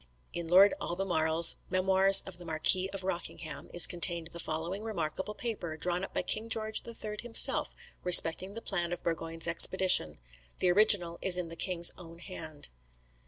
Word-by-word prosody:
[In 170 -1 -7
Lord 190 +4 +3
Albemarle's 170 -3 +1
"Memoirs 190 +1 +4
of 180 -2 -10
the - - -12
Marquis 170 +3 0
of 195 -1 -7
Rockingham." 170 -4 -8
is 175 - +5
contained 170 -1 -3
the 170 - -12
following 165 +5 -7
remarkable 190 -1 -7
state - - -16 0.2
paper, 160 -3 -9
drawn 175 +3 -2
up - - -9
by - - -5
King 220 +1 -3
George 220 -1 -3
III 215 -2 -9
himself 235 -1 +4 0.3
respecting 180 +2 +6
the 230 - -10
plan 175 -3 -5
of 175 - -10
Burgoyne's 165 0 -5
expedition. 170 - +2 0.4
The 180 - -1
original 180 -4 +2
is 185 -2 +3
in 175 -2 -6
the 165 - -12
king's 170 0 +3
own 170 -1 -15
hand. 160 -5 -10
175 Hz, 165 wpm, -27 LUFS, 165-195 Hz, 0.4 s, respecting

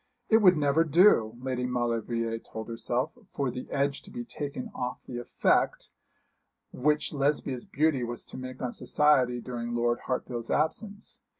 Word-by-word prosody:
It 220 - +7
would 185 -6 +6
never 145 +2 +3
do, 155 - +5
Lady 125 -1 -2
Maulevrier 115 -2 -1
told 110 -1 -8
herself, 120 +5 -1 0.2
for 135 -3 0
the 125 +1 -7
edge 140 0 0
to - - -14
be 240 +3 -6
taken 140 - -5
off 125 0 -4
the 120 - -5
effect 120 - +1 0.8
which 150 +4 +1
Lesbia's 140 -3 0
beauty 150 -3 +1
was 120 0 -5
to - - -10
make 130 0 -7
on 125 -1 -2
society 130 -5 +3
during 120 -1 -4
Lord 120 0 +1
Hartfield's 120 -2 -3
absence. 200 +7 -2
130 Hz, 155 wpm, -28 LUFS, 120-150 Hz, 0.8 s, It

